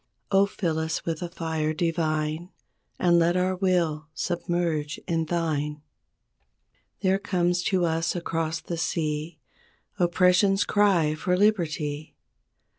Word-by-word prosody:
Oh, 195 0 +5
fill 170 -6 -2
us 160 0 -2
with 165 -2 -2
a 175 - -3
fire 160 -2 -2
divine 160 0 -1 0.5
And 175 -1 +4
let 170 +2 +3
our 185 +1 +1
will 175 -5 0
submerge 170 -4 -1
in 165 -1 0
Thine! 150 -3 -2 1.2
There 190 -1 +2
comes 180 -3 0
to 185 -3 +2
us 165 +1 0
across 165 -2 -2
the 170 - -5
sea, 155 -1 -2 0.6
Oppression's 180 +3 +4
cry 190 -7 +3
for 180 +4 0
liberty. 155 -7 0
170 Hz, 115 wpm, -26 LUFS, 155-180 Hz, 1.2 s, Oh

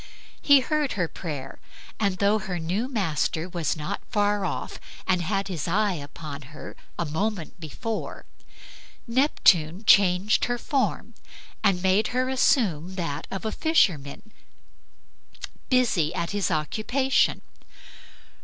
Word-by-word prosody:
He 285 -2 +6
heard 300 +1 0
her 180 -4 0
prayer, 145 -6 -7 0.4
and 200 -3 +1
though 205 +2 +3
her 190 -3 -4
new 180 +9 -2
master 175 - -1
was 170 -3 -2
not 170 +7 -4
far 205 -1 +1
off 170 - -4 0.3
and 185 -2 +2
had 195 +3 -1
his 175 -6 -4
eye 200 +3 +2
upon 145 -1 -7 0.2
her - - -9 0.2
a 170 - -1
moment 175 +3 -3
before, 215 - -5 0.8
Neptune 205 - +3
changed 200 0 +4
her 245 0 -1
form 270 +2 -1 0.5
and 195 -3 +2
made 190 +3 +3
her 255 0 +1
assume 190 - +2
that 165 -6 -4
of 195 +2 -5
a 220 - -1
fisherman 205 - +1 1.4
busy 220 - +2
at 170 - -2
his 205 -1 0
occupation. 215 - +1
195 Hz, 125 wpm, -25 LUFS, 165-220 Hz, 1.4 s, He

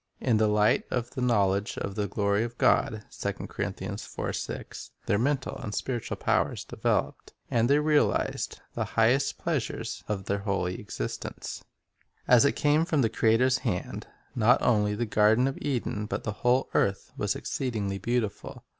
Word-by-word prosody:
In 120 -4 +2
"the 110 0 +3
light 105 0 +3
of 120 -1 -2
the 130 - -5
knowledge 100 -5 +1
of 100 - -3
the 105 0 -1
glory 100 +1 +1
of 120 0 -6
God," 110 -1 +2 0.2
1 - - -4 0.7
their 100 - +2
mental 135 +2 0
and 105 - -5
spiritual 120 -4 -3
powers - - 0
developed, - - -1 0.2
and 120 0 +2
they 140 - +5
realized 150 0 +1
the - - -1
highest 120 +5 +3
pleasures 120 -7 -3
of 100 -3 -3
their 100 0 -1
holy 100 -3 -2
existence. - - -6 0.6
As 125 +2 +6
it 140 - +3
came 150 +2 +3
from 155 -5 +1
the 115 - +2
.Creator's 125 +5 +3
hand, 95 -8 -3 0.3
not 120 +1 +4
only 105 -3 +2
the 120 +3 -1
garden 110 +4 +4
of 135 - -4
Eden 120 -6 -2
but - - -3
the 105 - -2
whole 125 +2 +2
earth 100 0 +1
was - - -1
exceedingly 105 -7 -3
beautiful. 120 -3 -2
115 Hz, 155 wpm, -28 LUFS, 105-125 Hz, 0.7 s, As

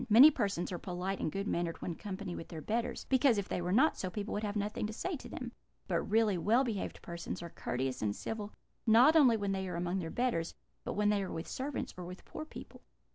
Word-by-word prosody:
Many 250 +8 +10
persons 200 - -1
are 175 - -3
polite 185 +1 -3
and - - -1
good 195 +3 -3
mannered 170 -3 -1
when - - -3
in 165 - -6
company 195 -3 -5
with - - -7
their 165 - -7
betters, 230 +8 -2
because, 260 -3 +4
if 200 - -1
they - - -2
were 175 +1 -1
not 265 +11 +4
so, 185 - -2
people 205 +2 -4
would 205 - -1
have 205 0 -2
nothing 210 +1 -1
to 215 - -6
say 360 +10 -2
to - - -10
them: - - -5 0.4
but - - +1
really 215 -4 +2
well 230 +9 +4
behaved 225 -7 -3
persons 170 0 -5
are 170 - -7
courteous 130 +1 -2
and 105 -1 0
civil, 215 -2 -4 0.4
not 245 +8 +7
only 260 -8 +7
when 200 -2 -1
they 190 -1 -1
are 180 - -4
among 175 +2 -1
their 165 -3 -3
betters, 205 -7 -1 0.3
but - - -3
when 210 0 +2
they 205 -1 +2
are 190 - -4
with 165 - -4
servants, 275 +2 -3
or 180 - -5
with 180 +2 -9
poor 310 - -6
people.' - - -11
200 Hz, 245 wpm, -33 LUFS, 175-225 Hz, 0.4 s, Many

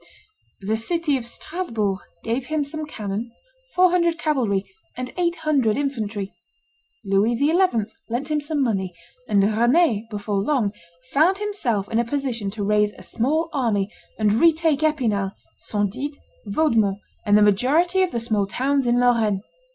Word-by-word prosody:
The 215 +3 -1
city 320 +5 0
of 245 -3 -4
Strasbourg 230 - -3 0.2
gave 245 +3 -2
him 310 -1 0
some 305 +2 -5
cannon, 215 -2 -4 0.4
four 365 0 +5
hundred 340 -2 +2
cavalry, 230 -11 0 0.3
and 255 0 -5
eight 345 -1 +1
hundred 290 -9 +1
infantry; 220 -8 -3 0.7
Louis 200 +4 +2
XI. 290 +5 +2 0.6
lent 265 +6 -2
him 300 -1 +1
some 290 -1 -1
money; 190 -7 -1 0.3
and 200 -2 +4
Rend 230 - +2
before 205 -1 -3
long 230 -3 +1 0.4
found 335 +7 +4
himself 270 - -1
in 225 - 0
a - - +3
position 240 -5 -2
to 205 +1 -4
raise 210 0 +2
a - - -13
small 305 +8 0
army 215 -7 0 0.3
and 210 -2 +2
retake 320 +3 +3
Epinal, 225 -11 +1 0.3
Saint 205 -2 -2
Did, 285 +3 -5 0.3
Vaudemont, 215 -5 +2 0.3
and 205 0 +4
the 210 - +5
majority 295 - +3
of 370 - +2
the 235 - -2
small 215 -4 0
towns 270 +5 0
in 240 0 +3
Lorraine. 225 -5 +2
240 Hz, 150 wpm, -23 LUFS, 210-305 Hz, 0.7 s, four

